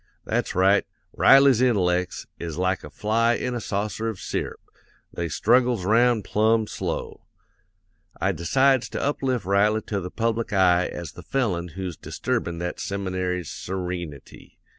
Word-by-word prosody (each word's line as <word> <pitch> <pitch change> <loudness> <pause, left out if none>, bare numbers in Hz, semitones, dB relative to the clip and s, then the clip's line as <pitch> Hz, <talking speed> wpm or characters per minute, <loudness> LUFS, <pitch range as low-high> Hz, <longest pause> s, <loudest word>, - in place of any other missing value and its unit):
That's - - -1
right; 95 +2 +4 0.3
Riley's 135 -3 +6
intellects, 90 -7 +1
is 85 -2 -5
like 95 +1 0
a - - -8
fly 115 +2 +1
in 125 +1 -2
a 120 - -3
saucer 105 +2 -2
of 105 -4 -6
syrup, - - -4 0.5
they 85 -1 -3
struggles 120 - +2
'round 115 +1 +3
plumb 110 +1 +2
slow. - - -5 0.9
I 95 - +1
decides 130 - +2
to - - -4
uplift 130 -6 -1
Riley 105 +3 +2
to 100 - -3
the 90 -1 -5
public 115 +2 -1
eye 90 -2 +4
as 85 -4 -7
the - - -11
felon 100 -11 -1
who's 95 -4 -5
disturbin' 85 -1 -3
that 85 +1 -4
seminary's 95 -3 -3
sereenity. 90 -5 -6
100 Hz, 140 wpm, -24 LUFS, 90-115 Hz, 0.9 s, Riley's